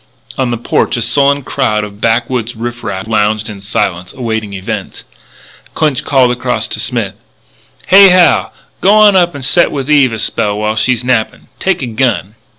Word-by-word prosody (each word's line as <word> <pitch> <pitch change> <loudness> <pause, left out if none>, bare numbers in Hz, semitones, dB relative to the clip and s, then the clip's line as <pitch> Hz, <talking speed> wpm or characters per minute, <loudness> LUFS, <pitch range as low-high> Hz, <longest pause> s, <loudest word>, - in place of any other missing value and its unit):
On 130 -2 -1
the 120 - -2
porch 120 - -1
a - - -2
sullen 140 +4 +2
crowd 105 -4 -1
of 105 0 -9
backwoods 120 +1 -1
riff 120 +1 -6
raff 105 -1 -5
lounged 110 -1 0
in 100 -2 -10
silence, 90 -3 -3
awaiting 110 -4 -4
events. 95 -1 -6 0.7
Clinch 150 -2 0
called 130 -4 +2
across 125 0 -2
to - - -4
Smith: - - -2 0.7
"Hey, 195 +1 +7
Hal, 180 -1 +3 0.3
g'wan 210 +1 +5
up 175 -4 +2
and 135 -3 -5
set 170 +4 +3
with 140 0 -3
Eve 140 -5 +4
a - - -3
spell 105 -1 -1
while 105 +1 -1
she's 120 +2 0
nappin'. 125 -3 -1
Take 190 -7 -1
a - - -1
gun." 115 -4 -1
120 Hz, 170 wpm, -13 LUFS, 110-140 Hz, 0.7 s, Hey